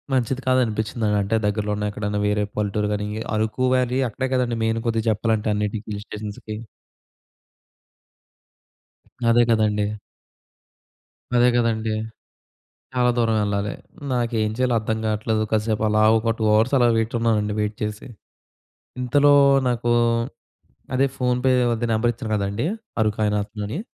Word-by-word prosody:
మంచిది 130 +1 0
కాదనిపిచ్చిందండి. 110 -3 +1
అంటే 110 +3 0
దగ్గరలో 105 0 -1
ఉన్న 105 - -2
ఎక్కడన్నా 105 0 -2
వేరే 105 0 +1
పల్లెటూరు 105 0 -1
గానీ 105 0 -2
ఈ - - -5
అరుకు 110 +4 -1
వ్యాలీ 125 0 +1
అక్కడే 130 +4 -3
కదండీ 120 -2 0
మెయిన్ 115 0 0
కొద్దిగ 115 -1 0
జెప్పాలంటే 110 0 0
అన్నిటికి, 105 +1 -3
హిల్ 100 - -7
స్టేషన్స్‌కి. 105 0 -7 2.7
అదే 120 +1 +5
కదండీ. 105 -2 +2 1.5
అదే 120 0 +5
కదండీ. 115 -2 0 1.0
చాలా 125 -1 +3
దూరం 115 -1 +2
ఎళ్ళాలి. 100 0 -1 0.4
నాకేం 115 -3 0
చెయ్యాలో 125 -1 +1
అర్థం 110 0 -2
కాట్లేదు. 110 +1 0
కసేపు 110 0 0
అలా 105 0 +3
ఒక 115 0 0
2 110 - -1
అవర్స్ 115 +6 +3
అలా 120 -1 +4
వెయిట్ 115 +1 -1
ఉన్నానండి 105 -3 +1
వెయిట్ 105 0 -2
చేసి. 105 +2 -4 0.9
ఇంతలో 145 +3 +4 0.4
నాకూ 120 0 0 1.0
అదే 135 +1 +3
ఫోన్‌పే 125 +1 +1 0.2
వాడిది 120 0 -1
నెంబర్ 115 +2 +2
ఇచ్చాను 110 -2 -5
కదండీ 100 +5 -2 0.4
అరుకాయిన 105 -1 +1
అతనని. 105 - -5
110 Hz, 130 wpm, -23 LUFS, 105-120 Hz, 2.7 s, అదే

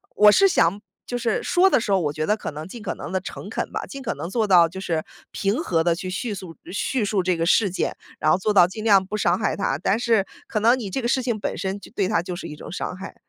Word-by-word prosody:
我 210 0 +7
是 390 - +5
想 200 - +2 0.3
就 245 - -3
是 230 -2 -1
说 370 +2 +4
的 - - +3
时 215 - -2
候， 195 - +4
我 150 -4 -1
觉 155 0 -2
得 210 - +2
可 - - -5
能 150 +1 -7
尽 230 +4 -9
可 - - -4
能 145 - -7
地 190 - 0
诚 - - -8
恳 - - -3
吧， - - -3
尽 275 - -8
可 265 - -2
能 170 - -5
做 220 +1 0
到 175 -4 +6
就 190 +3 -8
是 165 -4 -2 0.3
平 205 +8 -1
和 165 - +1
地 170 0 +3
去 185 +2 -5
叙 210 +5 -3
速 185 -4 -8 0.2
叙 230 +5 -1
述 205 -1 +1
这 180 0 +1
个 165 0 -1
事 200 +3 +4
件。 185 - -2 0.2
然 155 - +3
后 - - +4
做 210 +3 0
到 185 -3 +7
尽 215 +4 -7
量 200 -3 +5
不 210 +3 -4
伤 175 -3 +2
害 210 - 0
他， 140 -9 -1
但 195 +6 0
是 225 -5 +2 0.2
可 215 - -1
能 235 +4 +4
你 210 -5 -5
这 265 - -2
个 235 - -1
事 260 - +2
情 240 -3 -1
本 - - -3
身 190 +2 -3
就 - - -14
对 195 -5 0
他 165 - +1
就 180 0 -5
是 - - -6
一 150 - -8
种 - - -10
伤 180 - -4
害。 190 - -9
195 Hz, 315 characters per minute, -23 LUFS, 175-225 Hz, 0.3 s, 我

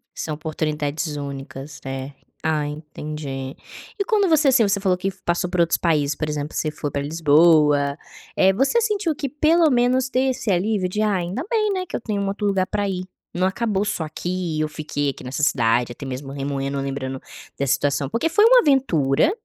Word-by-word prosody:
São 155 -2 -3
oportunidades 155 0 -3
únicas, 140 0 -7
é. 135 +1 -5 0.3
Ah, 155 -2 0
entendi. 150 -3 -6 0.4
E - - +2
quando 415 -4 +2
você, 310 -3 +4
assim, 255 -4 +5
você 200 0 +1
falou 190 -2 +1
que 190 +2 -2
passou 175 +1 0
por 180 -1 -2
outros 165 -1 +2
países, 150 -4 +1
por 155 - -3
exemplo, 150 0 -4
você 155 - -1
foi 150 -1 -4
para 140 -1 -2
Lisboa, 150 -2 +4 0.4
eh, 190 0 +5
você 275 - +2
sentiu 410 -8 0
que 275 -2 -3
pelo 315 +2 +3
menos 250 +1 +2
tem 260 +1 +1
esse 230 -4 -2
alívio 190 +1 +1
de: 210 +4 -2
"Ai, 200 -5 +1
ainda 195 - -3
bem, 430 -3 +1
né, 370 -1 -2
que - - -6
eu - - -3
tenho 205 -3 -2
um 200 - -1
outro 205 +1 -1
lugar 195 -2 +1
para 205 -1 -1
ir, 185 -1 -3 0.3
não 180 +1 +1
acabou 205 0 -1
só 170 - -2
aqui 175 0 -3
e - - 0
eu 155 - +1
fiquei 145 -2 -2
aqui 135 - -7
nessa 130 +3 -4
cidade, 120 -3 +2
até 140 - -9
mesmo 135 +1 -6
remoendo 140 0 -3
lembrando 135 -1 -4 0.4
da 140 - 0
situação." 140 +1 +1
Porque 275 +8 0
foi 420 +5 +4
uma - - +8
aventura 255 - +3
165 Hz, 200 wpm, -22 LUFS, 145-220 Hz, 0.4 s, uma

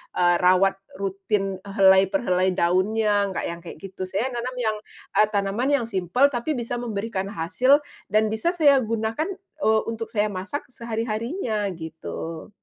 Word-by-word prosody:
eee, 175 0 +4
rawat 190 +2 +4 0.2
rutin 195 0 -1
helai 195 -1 +5
per 295 - +1
helai 185 0 +2
daunnya, 205 +4 +2
enggak 190 - -3
yang 170 - -5
kayak 170 - -9
gitu. 190 -1 -6
Saya 200 +7 -1
nanam 245 +2 -3
yang, 220 -3 0 0.4
eee, 210 - +6
tanaman 205 +6 0
yang - - -3
simpel 195 +8 +2
tapi 270 +3 -2
bisa 240 0 -3
memberikan 215 -4 -3
hasil, 255 - +3 0.3
dan 215 0 +3
bisa 220 +12 0
saya 290 -5 +5
gunakan, 225 +5 -1 0.4
eee, 220 0 +4
untuk 225 0 -4
saya 210 -1 +1
masak 200 +10 -5
sehari-harinya, 230 - -2
gitu. 160 0 -7
215 Hz, 150 wpm, -24 LUFS, 190-235 Hz, 0.4 s, eee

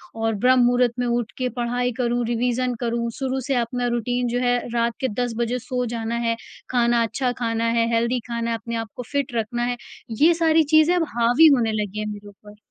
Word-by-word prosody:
और 225 0 0
ब्रह्म-मुहूर्त 245 +1 +3
में 245 - 0
उठ 235 -1 -1
के 255 -1 -1
पढ़ाई 245 +1 0
करूँ, 240 0 0
रिविज़न 245 +1 0
करूँ, 235 -1 -1
शुरू 265 0 -1
से 270 - +1
अपना 245 +1 -1
रूटीन 245 +1 -1
जो 245 +1 -1
है 245 -1 +2 0.2
रात 235 0 +1
के 260 - 0 0.2
10 240 -2 -3
बजे 240 +1 -1
सो 250 0 -3
जाना 230 +1 -3
है, 230 - +1 0.3
खाना 235 -1 +2
अच्छा 245 +3 -1
खाना 230 -1 -1
है, 230 - +2
हेल्थी 235 +2 +1
खाना 235 0 -2
है 230 - -1
अपने 230 +1 -6
आपको 225 +2 -5
फिट 280 -3 -1
रखना 240 +2 -2
है, 245 0 -1 0.5
ये 335 +2 +7
सारी 325 -1 +3
चीज़ें 315 +3 +6
अब 345 - +2
हावी 245 +7 +5
होने 225 -3 0
लगीं 210 +1 -5
हैं 215 - -3
मेरे 205 0 -11
ऊपर। 210 +1 -15
240 Hz, 210 wpm, -23 LUFS, 230-250 Hz, 0.5 s, ये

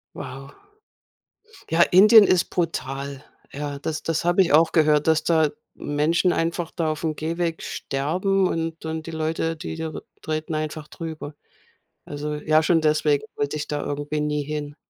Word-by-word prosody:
Wow. 135 +2 -8 1.2
Ja, 165 +1 +4
Indien 210 +5 +8
ist 185 -3 +3
brutal. 140 -5 -3 0.3
Ja, 145 0 -5
das 155 +2 -4
das 165 0 -1
habe 175 +2 +4
ich 170 - 0
auch 160 +2 +5
gehört, 150 -2 +3
dass 160 -1 +3
da 160 -3 +3 0.2
Menschen 155 +5 +1
einfach 165 +1 -1
da 160 -2 -1
aufm 155 0 -3
Gehweg 165 +1 -2
sterben 185 +8 0
und 165 0 -3
und 160 0 -4
die - - -5
Leute, 160 +1 -2
die 160 - -6
da 160 0 -3
re - - -8 0.2
treten 155 0 -3
einfach 155 0 -4
drüber. 160 -3 -7 0.7
Also 150 +1 -4
ja, 155 +1 +2
schon 165 -1 +3
deswegen 150 -2 +2
wollte 145 +1 -1
ich 150 - -4
da 145 -1 -2
irgendwie 145 +1 -3
nie 150 0 -1
hin. 145 0 -5
155 Hz, 160 wpm, -23 LUFS, 150-165 Hz, 1.2 s, Indien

